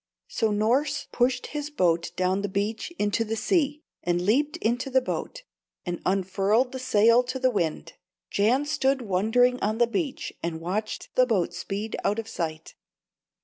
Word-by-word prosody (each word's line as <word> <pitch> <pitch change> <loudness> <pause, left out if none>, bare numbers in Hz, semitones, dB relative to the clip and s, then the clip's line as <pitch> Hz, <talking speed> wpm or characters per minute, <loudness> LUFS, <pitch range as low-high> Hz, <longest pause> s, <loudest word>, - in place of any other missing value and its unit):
So 225 - 0
Norss 255 +8 +1
pushed 250 +1 +1
his 295 0 -3
boat 170 - +1
down 185 +2 +1
the 205 - -2
beach 205 - -2
into 205 +2 +1
the 225 0 -3
sea, 295 - 0 0.2
and 175 0 0
leaped 255 +12 +1
into 240 +4 -1
the 260 0 +4
boat, - - -5 0.4
and 175 -2 -4
unfurled 195 +6 +1
the 260 - -5
sail 230 -1 +4
to 255 +2 -3
the 255 0 +2
wind. 165 -5 -2 0.4
Jan 240 +8 +2
stood 270 -3 +1
wondering 225 +6 +2
on 215 +2 0
the 240 - +5
beach, 270 +4 -3
and 165 -1 -3
watched 200 +6 -4
the 255 0 +4
boat 185 -7 +1
speed 200 +4 -4
out 205 - +1
of 225 -1 -4
sight. 160 -7 -5
225 Hz, 165 wpm, -26 LUFS, 195-255 Hz, 0.4 s, the